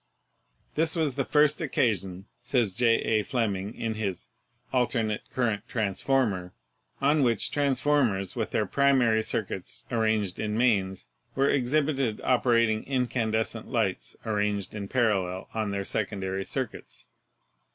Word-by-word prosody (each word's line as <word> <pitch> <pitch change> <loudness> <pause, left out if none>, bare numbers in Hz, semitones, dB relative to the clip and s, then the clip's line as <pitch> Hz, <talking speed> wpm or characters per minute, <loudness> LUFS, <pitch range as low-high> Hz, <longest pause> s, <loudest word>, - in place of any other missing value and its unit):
"This 160 +2 +2
was 155 -5 +1
the 135 +1 -1
first 150 +2 +3
occasion," 95 - -1 0.2
says 120 -5 +1
J. 115 +2 +4
A. 110 -1 +2
Fleming 105 -3 -2
in 115 -1 -2
his 100 -5 -4 0.4
'Alternate 115 -4 +1
Current 110 -5 -1
Transformer,' 105 -3 0 0.5
"on 145 +2 +3
which 120 -5 +1
transformers 135 -8 +1
with - - -2
their - - 0
primary 130 -5 +3
circuits 100 -4 -4
arranged 110 -5 0
in 105 0 -1
mains 100 -6 +1 0.3
were 135 +1 +3
ex 125 -3 0
hibited 140 -7 +1
operating 115 -3 +2
incandescent 115 -4 -1
lamps 110 -7 -1
arranged 105 -2 -1
in 100 -2 -5
parallel 100 -7 0
on 110 -2 -1
their 100 0 -2
secondary 95 -2 -2
circuits. 130 -4 -5
110 Hz, 125 wpm, -27 LUFS, 100-130 Hz, 0.5 s, J